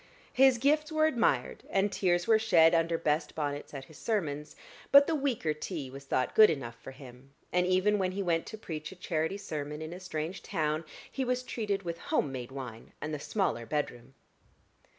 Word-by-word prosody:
His 265 -1 +6
gifts 300 +5 +2
were 310 0 +3
admired, 230 - +1
and 195 +1 +1
tears 175 -3 +1
were 220 -1 +5
shed 175 -7 +5
under 165 0 +2
best 155 0 -1
bonnets 145 -2 -3
at 135 -2 -7
his 155 - -15
sermons; 150 -9 -2 0.4
but 280 0 +9
the 330 - -1
weaker 265 - 0
tea 150 -3 -5
was 140 +1 -10
thought 130 -1 0
good 215 - +8
enough 125 -7 -3
for - - -9
him; 130 0 -13 0.2
and 180 0 +3
even 190 +3 +3
when 185 -1 0
he 200 +1 -2
went 165 -2 0
to 220 - -7
preach 155 -7 -6
a - - -10
charity 165 0 -2
sermon 150 -6 -5
in 160 +1 -6
a 180 - -8
strange 180 0 -4
town, 155 0 -1 0.3
he 270 - -2
was 250 0 -1
treated 205 -5 -2
with 170 -1 -4
home 140 - 0
made 125 -1 -6
wine 125 -4 -8
and 155 +1 -4
the 150 - -3
smaller 145 - -1
bedroom. 135 -4 -3
165 Hz, 195 wpm, -30 LUFS, 145-205 Hz, 0.4 s, but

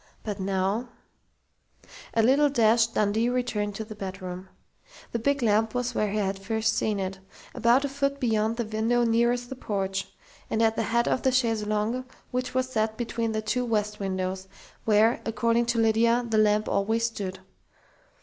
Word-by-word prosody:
But 210 -2 -4
now 195 +5 -1 1.3
A 225 - +4
little 280 +5 +4
dashed, 230 -3 +3
Dundee 215 +3 +2
returned 225 -5 -1
to 220 - -5
the 215 - -8
bedroom. 190 -2 -7 0.6
The 235 - -1
big 280 +3 0
lamp 220 +1 +2
was 245 0 -1
where 215 -2 0
he 210 - -2
had 195 -1 -1
first 220 +2 0
seen 210 -2 0
it 190 0 -4 0.3
about 245 +4 +3
a - - +1
foot 280 0 -1
beyond 225 -2 +1
the 235 - -1
window 225 +3 +1
nearest 240 +1 +1
the 265 - -5
porch, 195 -5 -2 0.4
and 220 - -1
at 225 -1 +3
the - - 0
head 235 +1 +2
of - - +1
the 260 - +2
chaise 225 -4 +1
longue 215 +4 -1 0.3
which 250 0 -3
was 255 0 +1
set 220 -2 -1
between 230 -1 -2
the 215 0 -2
two 250 +3 0
west 210 -3 -1
windows, 190 -1 -3 0.4
where, 220 +2 +4
according 230 +1 +1
to 235 0 0
Lydia, 230 +2 +3
the 220 -1 +2
lamp 210 0 +3
always 225 +3 +1
stood. 200 -5 -4
225 Hz, 175 wpm, -26 LUFS, 210-240 Hz, 1.3 s, A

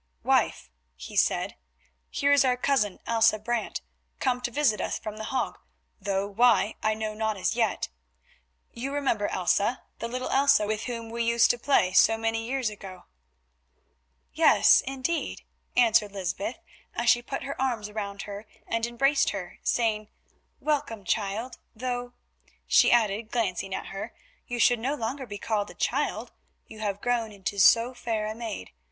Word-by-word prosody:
"Wife," 60 - +1 0.2
he 60 - -10
said, - - +1 0.5
"here 285 0 +1
is 285 -1 +6
our 250 -1 +2
cousin, 245 -7 +1
Elsa 225 -1 +4
Brant, 235 +1 -2 0.4
come 250 -2 0
to 245 - -2
visit 235 -4 +1
us - - -2
from 215 0 -7
The 220 - -5
Hague, 260 +1 -2 0.4
though 195 -1 -1
why 220 0 +3
I 215 0 +1
know 215 0 -3
not 220 -1 -1
as 195 - 0
yet. 225 -4 0 0.9
You 255 +4 -4
remember 235 -8 0
Elsa, 200 +6 0 0.2
the 230 - -3
little 255 +2 -4
Elsa, 275 -5 +4
with 215 +1 -2
whom 230 -2 -5
we 235 0 -1
used 235 0 +4
to 245 - -5
play 210 -9 +2
so 225 +4 +5
many 225 0 -1
years 255 -3 -1
ago." 195 -3 -10 1.3
"Yes, - - +6
indeed," 270 +5 -2 0.3
answered 220 -4 +4
Lysbeth, 195 +4 -3 0.4
as 235 - -2
she 240 +1 +5
put 270 +3 -5
her 275 0 -5
arms 240 -6 -1
about 205 -2 -5
her 205 +1 -8 0.2
and 230 0 -1
embraced 275 +4 +2
her, 185 -3 -6
saying, 215 -3 0 0.5
"welcome, 275 -8 -1
child, 220 +5 -2 0.2
though," 245 +1 -4 0.5
she - - +5
added, 220 -2 +2
glancing 195 -5 -1
at - - -6
her, 200 +4 -6 0.3
"you 245 - -3
should 240 0 +4
no 265 +6 -1
longer 260 +1 -4
be 205 -1 -6
called 210 0 -2
child - - -1 0.4
who 220 - -11
have 205 -2 -3
grown 240 -2 0
into 200 0 -4
so 230 +5 +6
fair 225 -3 -2
a 215 - -3
maid. 220 - -6
225 Hz, 160 wpm, -27 LUFS, 210-245 Hz, 1.3 s, is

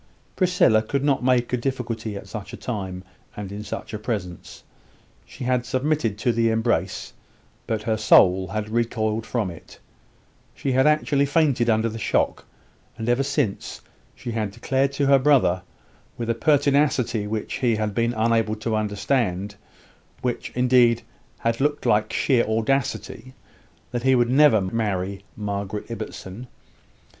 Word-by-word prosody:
Priscilla 180 - +3
could 135 +5 -2
not 140 -3 +1
make 125 -1 +2
a - - +3
difficulty 120 -4 -3
at 100 - -8
such 105 -3 -7
a - - -6
time, 95 -6 -5 0.3
and 100 -2 -6
in 105 +1 -6
such 110 - -6
a 105 - -3
presence; 100 -6 -5 0.6
she 130 - -9
had 125 -1 +1
submitted 130 -3 -1
to 120 +3 +1
the 115 0 +2
embrace, 110 -5 -1 0.5
but 110 -2 -2
her 110 0 0
soul 95 -3 +5
had 105 +1 -3
recoiled 110 -1 -1
from 110 -7 -1
it; 85 - -13 0.8
she 135 - -2
had 130 +2 +3
actually 145 -2 +2
fainted 140 -6 +2
under 110 0 +2
the 115 0 -5
shock: - - 0 0.5
and 110 - -5
ever 120 +2 +3
since, 140 -6 -2 0.3
she 120 - -6
had 110 -2 -1
declared 135 +6 0
to 140 0 0
her 140 0 +5
brother, 130 -10 +3 0.6
with 115 -1 -1
a - - +2
pertinacity 140 -5 +2
which 110 +3 -3
he 120 -4 +2
had 105 -1 -2
been 115 +3 0
unable 115 -1 +1
to 110 +1 -2
understand 105 -2 -1 0.7
which, 125 -1 -2
indeed, 125 -2 +4 0.3
had 115 +2 -1
looked 145 -1 0
like 110 -2 +2
sheer 125 -4 +2
audacity, 130 +2 -2 0.6
that 120 - -2
he 130 +1 +4
would 120 -1 +2
never 135 -6 +5
marry 100 -1 -2
Margaret 100 +1 -4
Ibbotson. 110 0 -7
115 Hz, 150 wpm, -23 LUFS, 105-130 Hz, 0.8 s, soul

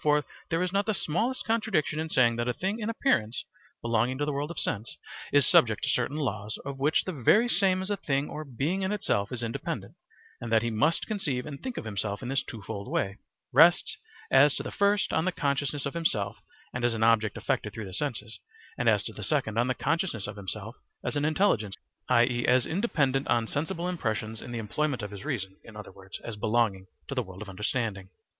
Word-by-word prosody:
For 150 0 +3 0.2
there 165 +2 +1
is 180 0 -2
not 200 +1 +1
the 215 - +1
smallest 225 +13 -1
contradiction 195 -9 +1
in 160 0 -2
saying 120 -5 +4
that 120 0 -1
a 125 - 0
thing 195 +4 -2
in 215 0 -2
appearance 125 - +1 0.4
(belonging 115 +2 +1
to 145 - 0
the 150 - -1
world 145 +2 -2
of 170 - -7
sense) 110 +1 -1 0.3
is 145 -1 +6
subject 110 -3 +5
to - - +2
certain 125 +4 0
laws, 105 -7 -2
of 140 -1 -5
which 145 +3 +3
the 185 - -3
very 195 - +4
same 190 -5 +2
as 195 - -3
a 205 - 0
thing 140 -4 0
or 155 - -5
being 145 +8 -1
in 190 +1 0
itself 100 - 0
is 120 -2 -3
independent, 115 0 -4 0.5
and 115 -1 -5
that 115 0 +4
he 120 - 0
must 150 +10 +2
conceive 150 - -2
and 145 -2 -7
think 255 -2 -5
of - - -4
himself 100 +1 -3
in 125 - -4
this 135 +1 +1
twofold 100 -4 -7
way, 95 0 -1 0.3
rests - - +6 0.4
as 135 +2 +6
to - - -3
the - - -5
first 200 0 +2
on 160 - +2
the 185 - +2
consciousness 145 -2 -1
of 140 - -2
himself 140 -12 +1 0.4
as 120 -1 0
an 110 - 0
object 110 -2 +3
affected - - -1
through 110 - -6
the 95 - -9
senses, 115 -2 -3 0.4
and - - +4
as - - +3
to - - -5
the - - -9
second 110 +1 0
on 120 - +3
the 130 - 0
consciousness 155 - -1
of 105 - -6
himself 105 +3 -5 0.3
as - - -2
an 145 0 +1
intelligence, 155 - +2 0.3
i.e., 120 0 +4
as 125 0 +4
independent 145 - +1
on 115 -1 +2
sensible 165 +8 -2
impressions 110 -10 -2
in - - -8
the 120 - -3
employment 125 +3 -1
of 105 - -5
his 100 -2 -8
reason 100 -10 -3
(in 110 - -13
other 105 -2 -8
words 95 0 -10
as 115 -3 -6
belonging 105 -3 +1 0.2
to - - -4
the 130 - +1
world 95 -2 -8
of - - -12
understanding). 100 0 -2
130 Hz, 220 wpm, -28 LUFS, 110-155 Hz, 0.5 s, is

